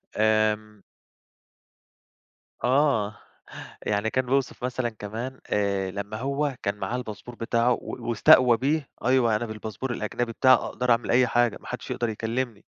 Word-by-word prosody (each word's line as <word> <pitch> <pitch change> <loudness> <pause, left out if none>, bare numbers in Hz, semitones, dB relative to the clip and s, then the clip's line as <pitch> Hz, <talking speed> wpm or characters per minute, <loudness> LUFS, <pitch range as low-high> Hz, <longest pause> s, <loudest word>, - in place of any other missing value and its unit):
آمم 110 -1 +1 1.8
آه، 125 -6 +2 0.7
يعني 105 +1 0
كان 130 +1 0
بيوصف 135 -1 -1
مثلًا 125 -1 -1
كمان 115 +4 -6
آآ 100 -2 0
لمّا 100 +2 -5
هو 140 +3 -1
كان 100 - -1
معاه 105 +3 -3
الباسبور 120 0 -7
بتاعه، 115 +1 +1
و - - -1 0.3
واستقوى 120 +1 +6
بيه، 140 +4 0 0.2
أيوه، 120 -3 +3
أنا 120 +2 -3
بالباسبور 110 +3 -6
الأجنبي 115 +1 -3
بتاعي 130 +3 +5
أقدر 125 -1 -1
أعمل 115 0 +2
أي 125 +1 +5
حاجة، 120 -2 +2
ما - - -15
حدّش - - -6
يقدر 120 - -1
يكلّمني. 115 0 -3
115 Hz, 140 wpm, -26 LUFS, 110-125 Hz, 1.8 s, واستقوى